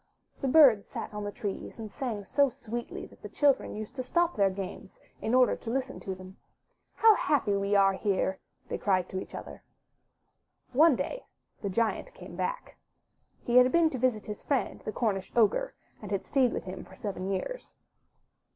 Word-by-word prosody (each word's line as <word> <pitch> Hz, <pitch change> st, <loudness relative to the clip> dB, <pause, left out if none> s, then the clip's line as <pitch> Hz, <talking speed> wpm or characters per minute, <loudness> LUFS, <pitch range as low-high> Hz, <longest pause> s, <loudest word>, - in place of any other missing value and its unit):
The 275 Hz, -, 0 dB
birds 260 Hz, -8 st, +6 dB
sat -, -, -6 dB
on 210 Hz, 0 st, -4 dB
the 205 Hz, -, -3 dB
trees 205 Hz, -3 st, -5 dB
and 220 Hz, -2 st, -7 dB
sang 225 Hz, -5 st, -4 dB
so 280 Hz, +7 st, +3 dB
sweetly 240 Hz, -2 st, -6 dB
that -, -, -18 dB
the -, -, -8 dB
children 285 Hz, -3 st, +2 dB
used 215 Hz, +4 st, -7 dB
to -, -, -1 dB
stop 340 Hz, +7 st, +1 dB
their 200 Hz, -2 st, +4 dB
games 190 Hz, 0 st, -7 dB, 0.2 s
in 225 Hz, +3 st, +1 dB
order 255 Hz, -1 st, +5 dB
to 225 Hz, -, -7 dB
listen 260 Hz, +2 st, -2 dB
to 190 Hz, -, -5 dB
them. 185 Hz, 0 st, -12 dB, 0.6 s
How 445 Hz, -1 st, +7 dB
happy 275 Hz, -, +1 dB
we 200 Hz, +1 st, +1 dB
are 195 Hz, -1 st, +5 dB
here!*' 190 Hz, -1 st, 0 dB, 0.3 s
they -, -, -4 dB
cried 185 Hz, -3 st, +1 dB
to 190 Hz, -, -3 dB
each -, -, -8 dB
other. -, -, -8 dB, 1.1 s
One 305 Hz, +2 st, +6 dB
day -, -, -4 dB, 0.3 s
the 200 Hz, -, -2 dB
Giant 230 Hz, -, -1 dB
came -, -, -10 dB
back. -, -, -4 dB, 0.7 s
He 240 Hz, +1 st, +3 dB
had 250 Hz, 0 st, +7 dB
been 330 Hz, 0 st, +4 dB
to 260 Hz, -, -4 dB
visit 235 Hz, -4 st, +1 dB
his 210 Hz, -1 st, -6 dB
friend, 275 Hz, -3 st, -1 dB
the -, -, -4 dB
Cornish 205 Hz, -5 st, -1 dB
ogre, 240 Hz, -, +2 dB, 0.3 s
and 210 Hz, -, -8 dB
had 195 Hz, -1 st, -2 dB
stayed 260 Hz, -4 st, +3 dB
with -, -, -3 dB
him 185 Hz, 0 st, -7 dB
for -, -, -15 dB
seven 195 Hz, -5 st, -4 dB
years. 195 Hz, -, -4 dB
225 Hz, 190 wpm, -29 LUFS, 200-265 Hz, 1.1 s, How